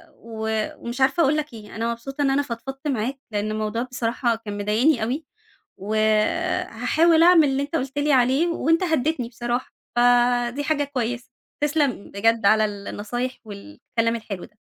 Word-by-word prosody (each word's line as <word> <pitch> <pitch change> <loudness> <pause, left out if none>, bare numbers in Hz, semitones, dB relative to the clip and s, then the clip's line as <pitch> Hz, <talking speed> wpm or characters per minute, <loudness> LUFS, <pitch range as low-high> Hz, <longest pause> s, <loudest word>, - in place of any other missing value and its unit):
و 220 -1 -3
ومش 240 +3 -6
عارفة 270 +6 +3
أقول 300 +1 +3
لك 300 -3 -3
إيه، 215 -2 -11
أنا 230 +2 -1
مبسوطة 270 +5 -6
إن 280 - +3
أنا 275 +1 +2
فضفضت 270 +2 -6
معاك، 260 0 -2
لإن 210 0 -1
الموضوع 215 +1 -2
بصراحة 240 -1 -1
كان 210 -2 -7
مضايقني 220 +6 +2
أوي، 270 +7 -2 0.5
و 205 +3 -4 0.7
هاحاول 330 0 +3
أعمل 335 -3 +6
اللي 270 +1 0
أنت 290 +3 -3
قُلت 270 -1 -3
لي 290 +1 +2
عليه، 265 +5 +3
وأنت 330 0 +1
هدّيتني 315 -6 0
بصراحة، 240 +1 -3 0.2
فدي 245 +2 +3
حاجة 290 -1 +1
كويسة. 245 -3 -3 0.3
تسلم 290 -7 0
بجد 225 +1 +1
على 215 +1 +5
ال 205 -1 -5
النصايح 245 +5 -4
والكلام 215 - -3
الحلو 205 -5 -7
ده. 210 -2 -18
245 Hz, 165 wpm, -23 LUFS, 220-285 Hz, 0.7 s, أعمل